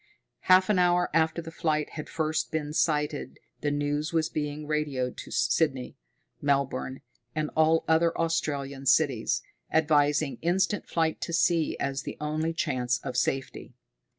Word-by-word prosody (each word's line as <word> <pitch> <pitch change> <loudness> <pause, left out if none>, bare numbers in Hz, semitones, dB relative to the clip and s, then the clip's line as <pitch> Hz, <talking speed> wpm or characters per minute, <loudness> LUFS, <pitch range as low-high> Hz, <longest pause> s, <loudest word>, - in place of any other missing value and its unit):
Half 185 +1 +6
an 195 - +2
hour 175 0 +3
after 160 +1 +1
the 165 - -8
flight 155 -2 -1
had 155 - -7
first 155 -1 -1
been 150 -2 -2
sighted 150 -2 0 0.2
the 150 - -1
news 145 +2 -1
was 160 -2 +1
being 150 0 -3
radioed 145 -5 -1
to - - -8
Sydney, 125 +1 0 0.5
Melbourne, 135 -2 -1 0.3
and 155 -1 -1
all 160 +1 +3
other 165 +1 +3
Australian 140 -4 -2
cities, 130 -4 +2 0.3
advising 150 -2 +2
instant 190 +4 0
flight 160 -1 0
to 170 - -4
sea 170 -1 +2
as 135 -1 -2
the - - -7
only 155 +2 -1
chance 130 -7 0
of 125 - -5
safety. 135 0 -2
150 Hz, 145 wpm, -28 LUFS, 140-165 Hz, 0.5 s, Half